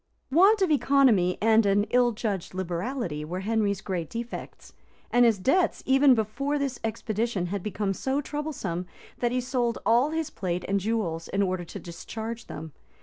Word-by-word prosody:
Want 390 +7 +5
of 360 - +2
economy 260 -11 +4
and 225 0 +5
an 200 +1 +3
ill 245 -1 +4
judged 205 -5 -3
liberality 180 - -3
were 180 +4 -4
Henry's 205 -2 0
great 175 -5 -3
defects; 235 +1 -7 0.4
and 245 0 +5
his 225 -3 +4
debts, 335 - +1
even 270 0 +5
before 275 +7 -1
this 275 -2 -2
expedition, 220 -2 -2
had 195 +2 -3
become 205 0 -2
so 265 +8 -1
troublesome, 275 - -4 0.3
that 240 -1 +1
he 250 - +1
sold 245 -2 -1
all 240 +6 +4
his 320 -1 -2
plate 180 -1 -3
and 200 +1 +1
jewels, 190 -6 -2
in 200 +1 0
order 185 -2 -1
to - - -8
discharge 220 +7 -7
them. 160 -1 -7
225 Hz, 165 wpm, -27 LUFS, 190-260 Hz, 0.4 s, Want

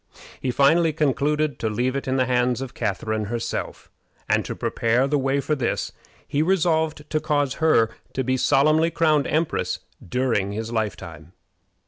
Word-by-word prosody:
He 130 - -1
finally 155 +6 +3
concluded 150 -1 0
to 110 - -1
leave 125 +5 -1
it 140 - -3
in 130 +1 0
the 130 - +2
hands 125 0 +1
of 135 -2 -6
Catharine 110 0 -2
herself, 115 +2 -4 0.4
and, - - +2
to - - -5
prepare 120 +3 +1
the 145 +1 +1
way 135 +1 +1
for 140 +3 -1
this, 130 -5 -1 0.4
he 145 - 0
resolved 160 -3 +1
to 155 - +1
cause 145 -3 0
her 135 -9 +4 0.2
to 130 - -1
be 130 +1 +1
solemnly 155 +5 +3
crowned 155 -3 +2
empress 160 +1 0 0.3
during 110 -3 0
his 110 +2 -4
lifetime. 85 -7 -4
135 Hz, 160 wpm, -23 LUFS, 115-150 Hz, 0.4 s, her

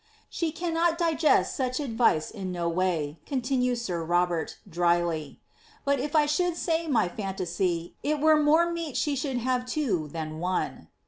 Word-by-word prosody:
" - - -36
*^ 335 - +3
^e - - -20
cannot 335 -1 +1
digest 330 -2 +2
such 255 0 -1
advice 230 - +1
in 190 -4 -5
no 175 -1 -2
way," 165 -4 -1
continues 250 -2 0
sir 175 -6 -2
Robert, 175 0 0
drily; 170 -3 0
^ - - -45 0.4
but 280 -1 +2
if 290 +4 -3
1 300 -1 +5
should 345 +3 +1
say 330 -1 0
my 250 - +2
fimtasy, 175 -3 -2
it 300 +1 0
were 310 0 +5
more 320 +3 +4
meet 335 -5 -3
she 295 -2 +1
should 270 -1 -2
have 250 +1 0
two 250 - -1
than 155 0 -5
one." 180 +2 -2
245 Hz, 175 wpm, -27 LUFS, -, 0.4 s, 1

